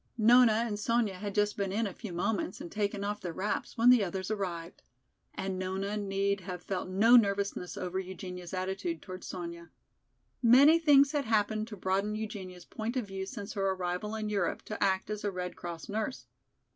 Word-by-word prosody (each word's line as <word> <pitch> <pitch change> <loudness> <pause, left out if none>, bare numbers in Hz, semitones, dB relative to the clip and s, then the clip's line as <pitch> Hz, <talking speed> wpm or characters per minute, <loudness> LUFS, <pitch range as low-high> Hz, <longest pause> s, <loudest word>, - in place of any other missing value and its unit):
Nona 235 +1 +6
and 210 -3 -3
Sonya 230 -1 +1
had 200 +2 -6
just 210 0 +2
been 200 -2 -1
in 220 +3 0
a 195 - -4
few 215 -1 -8
moments 185 +2 -1
and 170 - -8
taken 205 -1 -1
off 205 +1 -3
their 175 -2 -4
wraps 205 +7 -3
when 235 +2 +7
the 245 -4 +5
others 190 +2 -3
arrived. 180 -5 -4 0.5
And 190 -1 -3
Nona 190 +2 -2
need 200 -1 0
have 180 -1 -7
felt 185 -1 -3
no 215 +6 +6
nervousness 200 -4 +2
over 185 +1 -2
Eugenia's 180 -1 -7
attitude 190 - -3
toward 185 -1 -8
Sonya. 170 -1 -7 0.7
Many 275 +7 +7
things 285 -3 +6
had 290 -3 -1
happened 215 0 +1
to 210 -3 -8
broaden 195 +3 0
Eugenia's 195 -5 -6
point 225 +4 -4
of 245 - -1
view 190 -1 -5
since 215 -3 -6
her 195 -2 0
arrival 185 +3 -2
in 215 -1 -3
Europe 200 -5 -1
to 215 - -3
act 190 +1 +1
as 210 -1 -4
a 205 - +1
Red 180 -2 -5
Cross 170 -2 -7
nurse. 220 +5 -3
200 Hz, 190 wpm, -31 LUFS, 185-220 Hz, 0.7 s, when